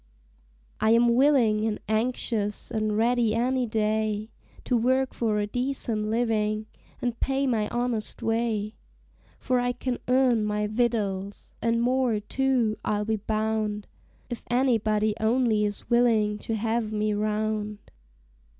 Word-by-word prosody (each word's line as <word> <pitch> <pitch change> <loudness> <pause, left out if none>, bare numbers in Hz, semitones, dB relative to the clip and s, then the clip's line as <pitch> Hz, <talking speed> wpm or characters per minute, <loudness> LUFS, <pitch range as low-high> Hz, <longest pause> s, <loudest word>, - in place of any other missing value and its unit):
I 220 - +2
am 235 0 +4
willin' 240 -5 +4
and 220 -1 -1
anxious 220 -2 -1
an' 215 -1 0
ready 230 0 +2
any 250 +1 +1
day 215 0 -1 0.3
To 250 - 0
work 260 +3 +1
for 220 -3 0
a 205 - +1
decent 240 -2 -2
livin', 215 -2 0 0.4
an' 245 - +1
pay 275 +1 0
my 225 -5 +1
honest 240 -2 -3
way; 225 -2 -1 0.6
For 255 -1 0
I 245 0 0
can 250 0 -3
earn 250 -3 +3
my 210 0 -1
victuals, 210 -3 -2
an' 230 0 +1
more 250 -2 +1
too, 245 -1 0
I'll 210 0 -1
be 220 0 0
bound, 215 0 -2 0.4
If 240 -2 -6
anybody 220 -4 +2
only 220 -1 +2
is 205 -1 -5
willin' 225 -4 +2
to 225 - -3
have 220 0 -1
me 215 0 0
round. 210 0 -1
220 Hz, 130 wpm, -26 LUFS, 215-245 Hz, 0.6 s, am